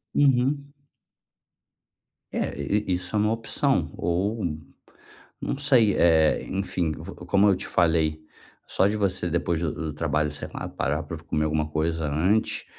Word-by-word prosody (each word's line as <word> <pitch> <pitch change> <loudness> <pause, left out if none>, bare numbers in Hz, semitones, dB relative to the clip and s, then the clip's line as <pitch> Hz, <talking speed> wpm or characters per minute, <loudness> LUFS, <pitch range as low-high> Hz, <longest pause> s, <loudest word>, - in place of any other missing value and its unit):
Uhum. 140 +1 +2 1.6
É, - - -2
e 105 +9 0
e - - +3
isso 90 +3 -3
é - - +3
uma 105 +1 +2
opção 115 0 +1
ou 100 +5 -1 1.0
não - - -2
sei, 130 -8 +4
é, 80 -2 +4
enfim, 95 -4 -1
v 80 +5 -8
como 100 +3 +4
eu 100 - +5
te 90 - -5
falei, 80 -2 +2 0.5
só 95 - +2
de 105 +2 0
você 95 -4 0
depois 85 -1 0
do 85 -3 -1
do 80 -2 -4
trabalho, 75 0 0
sei 75 - -7
lá, - - -5
parar 75 +3 -2
para 85 +2 -6
comer 75 -1 -1
alguma 75 0 0
coisa 80 +1 -1
antes, 90 +9 +1
90 Hz, 155 wpm, -25 LUFS, 80-105 Hz, 1.6 s, eu